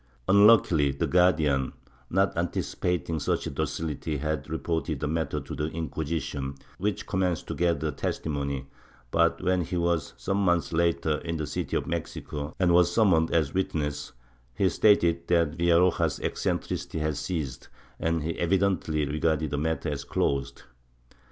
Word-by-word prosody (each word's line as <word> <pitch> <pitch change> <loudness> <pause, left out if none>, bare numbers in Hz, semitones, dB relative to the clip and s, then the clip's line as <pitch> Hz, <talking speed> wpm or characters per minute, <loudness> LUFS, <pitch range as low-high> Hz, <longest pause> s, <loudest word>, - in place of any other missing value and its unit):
Unluckily 100 -7 +6
the 70 - -1
Guardian, 80 -7 +2 0.4
not 95 +2 +2
anticipating 85 -1 -1
such 70 - 0
docility, 75 +1 -3
had 75 +1 -3
reported 80 -2 -2
the 75 - -2
matter 80 +1 -1
to - - -8
the 75 - -2
Inquisition, 80 -3 -3 0.2
which 105 +1 -1
commenced 90 -3 -1
to - - -4
gather 80 -3 0
testimony, 70 -4 -3 0.5
but 85 0 +2
when 90 0 +2
he 90 +3 -3
was, 85 -2 0
some 95 +11 -1
months 85 -4 +1
later, 80 -2 +1
in 85 -1 -4
the 80 - -2
city - - -2
of - - -3
Mexico 75 -2 -5
and 90 -2 +3
was 90 0 +5
summoned 90 -6 +3
as 80 -4 +1
a - - -16
witness, 75 -6 -2 0.4
he 95 - +3
stated 85 -4 +3
that 85 -3 +3
Villaroja's 85 +1 +3
eccentricities - - -2
had 75 -1 0
ceased, 75 -5 -4 0.3
and 80 -1 0
he 80 +1 -3
evidently 85 -4 +1
regarded 75 0 0
the 75 - -1
matter 80 +1 -1
as 70 -1 -3
closed. 70 0 -1
80 Hz, 145 wpm, -27 LUFS, 75-85 Hz, 0.5 s, Unluckily